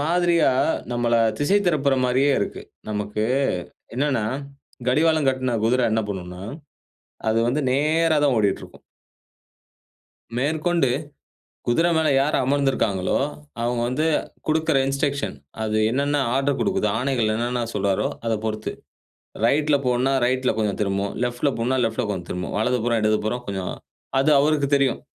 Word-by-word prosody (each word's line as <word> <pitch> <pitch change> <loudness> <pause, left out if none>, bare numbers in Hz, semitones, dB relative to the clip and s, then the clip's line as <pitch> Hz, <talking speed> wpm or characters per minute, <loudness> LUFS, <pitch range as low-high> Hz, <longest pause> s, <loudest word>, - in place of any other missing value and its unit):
மாதிரியா, 170 +1 +3 0.4
நம்மள 120 -1 +1 0.2
திசை 190 +8 +3
திருப்புற 140 -5 +2
மாரியே 130 +3 +3
இருக்கு. - - -4 0.3
நமக்கு 105 0 -2 0.7
என்னானா, 130 -4 0 0.6
கடிவாளம் 155 +2 +3
கட்ன 130 -2 0
குதிர 125 +3 +2
என்ன 110 - +2
பண்ணும்னா, 90 -2 -6 0.9
அது 110 +1 +2
வந்து 140 +5 0
நேரா 155 +3 +2
தான் 140 - +3
ஓடிட்டிருக்கும். 100 -3 -1 1.6
மேற்கொண்டு, 155 +3 +1 0.8
குதிர 160 +8 +3
மேல 160 -1 +2
யார் 145 +3 +1
அமர்ந்திருக்காங்களோ, 130 -9 +1 0.4
அவுங்க 120 0 0
வந்து 150 +6 0 0.4
குடுக்கிற 160 -2 +2
இன்ஸ்ட்ரக்ஷன். 140 - -1 0.3
அது 110 0 -1
என்னென்ன 140 +4 0 0.2
ஆர்டர் 135 +1 +1
குடுக்குதோ, 195 -1 +1
ஆணைகள் 125 -4 +1
என்னென்ன 120 +2 -1
சொல்றாரோ, 100 -1 +1 0.2
அத 115 - +1
பொறுத்து. 110 -1 -3 0.7
ரைட்ல 145 +4 +3
போன்னா 125 +2 +2
ரைட்ல 130 +1 +1
போவும், 105 -2 -1
திரும்பும். 100 0 -1
லெஃப்ட்ல 125 +4 0
போன்னா, 125 +3 0
லெஃப்ட்ல 110 0 -1
கொஞ்சம் 90 -3 -5
திரும்பும். 90 0 -4
வலதுபுறம், 115 +1 +1
இடதுபுறம் 110 +3 0
கொஞ்சம். 95 -2 -3 0.5
அது 150 +3 +3
அவருக்கு 145 -1 +2
தெரியும். 140 -3 +1
130 Hz, 125 wpm, -23 LUFS, 110-145 Hz, 1.6 s, மாதிரியா